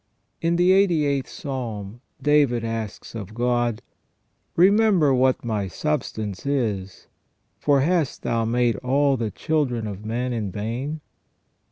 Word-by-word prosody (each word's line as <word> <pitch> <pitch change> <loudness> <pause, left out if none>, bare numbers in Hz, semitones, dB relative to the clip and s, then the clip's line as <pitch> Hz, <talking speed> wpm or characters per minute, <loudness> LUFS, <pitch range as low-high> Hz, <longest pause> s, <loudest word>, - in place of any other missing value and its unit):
In 170 +1 +1
the 175 +2 +4
88th 155 -8 +3
Psalm 120 -6 -6 0.2
David 140 -4 +3
asks 115 -2 -5
of 105 -2 -7
God: 120 -1 0 0.4
" - - -47 0.3
Remember 190 -5 +5
what 130 -1 +2
my 105 -4 -1
substance 110 - -3
is: 110 -9 -2 0.5
for 140 -2 +3
hast 160 -1 0
Thou 115 -1 0
made 120 -1 +1
all 140 +3 +2
the 115 -3 -2
children 130 -5 -1
of 105 -1 -6
men 120 +3 -2
in 105 -5 -3
vain 120 - -4
125 Hz, 130 wpm, -24 LUFS, 110-145 Hz, 0.5 s, Remember